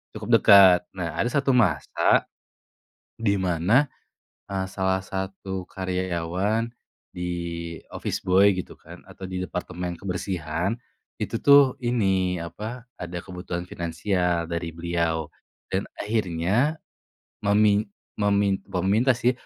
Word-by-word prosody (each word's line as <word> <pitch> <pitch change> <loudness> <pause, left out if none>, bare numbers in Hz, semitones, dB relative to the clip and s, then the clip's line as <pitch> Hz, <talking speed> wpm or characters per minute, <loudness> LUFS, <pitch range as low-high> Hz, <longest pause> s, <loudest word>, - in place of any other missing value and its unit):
cukup 110 +1 -7
dekat. 95 -4 +8 0.2
Nah, 85 -3 -4
ada 120 - +2
satu 140 0 +1
masa 100 - +3 0.9
di 105 -3 +1
mana 95 - +2 0.8
salah 95 0 0
satu 95 0 -5
karyawan 95 +4 -1 0.4
di 90 - -6 0.7
office - - -3
boy 95 +2 +5
gitu 90 - -6
kan - - -13
atau 95 - -13
di 95 0 -4
departemen 90 -1 -4
kebersihan, 90 +2 -2 0.4
itu - - -3
tuh 140 -2 +7
ini, 95 -6 +1
apa, 110 +8 -7
ada 90 0 -6
kebutuhan 90 -1 -6
finansial 85 0 -1
dari 85 -1 -3
beliau 85 -1 -1 0.4
dan 95 +1 0 0.2
akhirnya 105 - 0 0.6
memin 105 0 +3 0.3
memin 100 -1 +2
bukan 90 -1 -2
meminta 125 +5 +4
sih. 125 +1 +2
95 Hz, 110 wpm, -25 LUFS, 90-105 Hz, 0.9 s, dekat